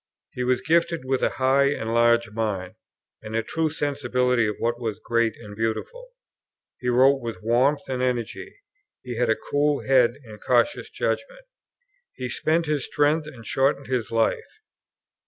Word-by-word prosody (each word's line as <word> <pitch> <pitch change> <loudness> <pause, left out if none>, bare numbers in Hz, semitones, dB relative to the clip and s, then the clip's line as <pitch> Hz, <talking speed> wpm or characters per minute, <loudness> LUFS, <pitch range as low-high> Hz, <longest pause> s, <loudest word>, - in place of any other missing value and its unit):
He 125 - -4
was 125 0 +1
gifted 170 +3 +1
with 130 0 0
a - - +3
high 135 +1 +3
and 115 -5 -1
large 120 -1 +3
mind, 105 -4 -3 0.5
and 110 0 -7
a 115 - +1
true 160 +7 -1
sensibility 125 -5 0
of 105 - -2
what 120 +1 -1
was 110 -4 -3
great 115 -2 0
and 105 -3 -11
beautiful; 115 - -3 0.7
he 125 - -2
wrote 135 +3 +4
with 115 -6 -6
warmth 130 +6 +2
and 130 -1 -2
energy; 125 -3 -2
and 390 - -19 0.5
he 125 -2 -6
had 120 -1 +1
a 110 - +4
cool 145 +3 0
head 125 -3 +4
and 110 -3 -12
cautious 125 - +1
judgment. - - -3 0.7
He 125 - -5
spent 160 +6 0
his 150 -3 -1
strength 150 +1 +1
and 125 -7 -11
shortened 135 +2 +1
his 125 -4 -2
life. 115 -1 -1
125 Hz, 165 wpm, -24 LUFS, 115-145 Hz, 0.7 s, wrote